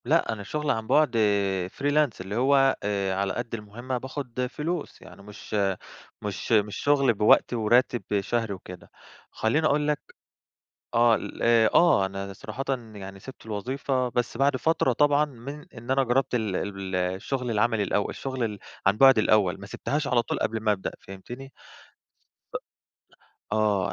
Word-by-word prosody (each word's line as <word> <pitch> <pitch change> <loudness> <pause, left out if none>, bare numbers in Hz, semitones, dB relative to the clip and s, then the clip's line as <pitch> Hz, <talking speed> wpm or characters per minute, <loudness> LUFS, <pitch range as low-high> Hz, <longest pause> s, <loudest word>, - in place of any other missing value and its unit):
لأ، 150 -3 +2
أنا 105 -2 -7
شُغل 150 +8 -1
عن 110 0 -2
بُعد 150 -4 +3 0.6
freelance 145 -5 +1
اللي 95 +2 -5
هو 135 +2 +4
آآ 100 -2 -1
على 100 0 -1
قد 120 -1 -5
المهمة 115 +4 -5
باخد 125 -1 -4
فلوس. 160 +4 -4
يعني - - -13
مش 105 +1 -11 0.7
مش 105 +1 -5
مش 105 -2 +3
شُغل 140 -4 +3
بوقت 105 +3 +4
وراتب 120 +2 +2 0.2
شهري 115 0 -1
وكده. 90 -1 -11 0.4
خلّيني 150 +8 +1
أقول 150 0 +1
لك 150 -1 +1 1.0
آه 115 0 +5
ال - - -5
أ 115 -2 +5
آه. 150 - +5
أنا 100 0 -6
صراحةً 110 +6 -6 0.3
يعني 95 -1 -9
سِبت 130 +1 -12
الوظيفة، 125 +4 -1
بس 120 -1 -2
بعد 140 +1 +2
فترة 160 -2 +2
طبعًا 145 +3 +3
من 140 +2 -9
إن 120 +1 -9
أنا 135 +1 +3
جرّبت 130 +1 +1
ال 100 -3 -1
ب - - -14
ال 95 -1 -5
الشُغل 95 +8 -2
العملي 115 0 +2
الأول، 100 +1 0
الشُغل 130 -2 -3
ال 105 -2 -3 0.3
عن 100 +1 +4
بُعد 135 0 +7
الأول، 100 -3 +3
ما 100 - -8
سِبتهاش 145 +7 -2
على 125 -4 +2
طول - - -3
قبل 110 0 -1
ما 110 -1 +2
أبدأ. 95 -2 -3
فهمتني؟ 120 +8 -10 1.0
أ - - +3 1.0
آه. 105 -3 +1
115 Hz, 160 wpm, -26 LUFS, 105-135 Hz, 1.0 s, بُعد